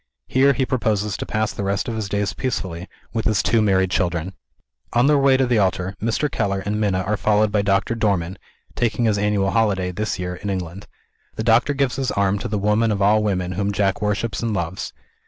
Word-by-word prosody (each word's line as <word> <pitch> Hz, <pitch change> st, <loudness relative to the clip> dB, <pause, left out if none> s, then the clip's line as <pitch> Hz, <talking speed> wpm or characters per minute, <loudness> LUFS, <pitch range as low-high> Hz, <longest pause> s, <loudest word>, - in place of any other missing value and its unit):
Here 140 Hz, +2 st, +3 dB
he 130 Hz, +1 st, 0 dB
proposes 105 Hz, -6 st, 0 dB
to -, -, -5 dB
pass 110 Hz, 0 st, -1 dB
the -, -, -4 dB
rest 100 Hz, 0 st, -1 dB
of 115 Hz, -, -3 dB
his 110 Hz, -3 st, -3 dB
days 100 Hz, 0 st, -1 dB
peacefully, 95 Hz, -9 st, -3 dB, 0.3 s
with 115 Hz, -2 st, -2 dB
his 110 Hz, -3 st, +2 dB
two 115 Hz, -1 st, +3 dB
married 95 Hz, -3 st, +2 dB
children. 90 Hz, 0 st, -1 dB, 0.6 s
On 120 Hz, +2 st, +4 dB
their 145 Hz, 0 st, +4 dB
way 135 Hz, -1 st, +4 dB
to 130 Hz, -, +2 dB
the 120 Hz, -3 st, +2 dB
altar, 95 Hz, -1 st, 0 dB
Mr. 115 Hz, +7 st, 0 dB
Keller 100 Hz, -7 st, -2 dB
and 105 Hz, +1 st, -1 dB
Minna 95 Hz, -3 st, +1 dB
are 105 Hz, +3 st, -1 dB
followed 105 Hz, 0 st, +2 dB
by 105 Hz, -1 st, +2 dB
Doctor 100 Hz, +3 st, +1 dB
Dormann 95 Hz, -5 st, -1 dB, 0.4 s
(taking 120 Hz, 0 st, 0 dB
his 105 Hz, -2 st, +2 dB
annual 100 Hz, -1 st, +1 dB
holiday, 100 Hz, -5 st, +1 dB
this 100 Hz, +1 st, -3 dB
year, 90 Hz, -1 st, -4 dB
in 100 Hz, -, -5 dB
England). 95 Hz, +1 st, -5 dB, 0.5 s
The 110 Hz, -, -3 dB
doctor 120 Hz, +5 st, +3 dB
gives 135 Hz, -2 st, 0 dB
his 135 Hz, -2 st, -1 dB
arm 100 Hz, 0 st, +1 dB
to -, -, -4 dB
the 105 Hz, -, -2 dB
woman 105 Hz, +3 st, +2 dB
of 100 Hz, -, -1 dB
all 105 Hz, +2 st, +4 dB
women 95 Hz, -4 st, -1 dB
whom 100 Hz, +2 st, -1 dB
Jack 100 Hz, 0 st, 0 dB
worships 105 Hz, +2 st, -1 dB
and 115 Hz, -3 st, -1 dB
loves. 85 Hz, 0 st, -3 dB
105 Hz, 215 wpm, -21 LUFS, 95-115 Hz, 0.6 s, On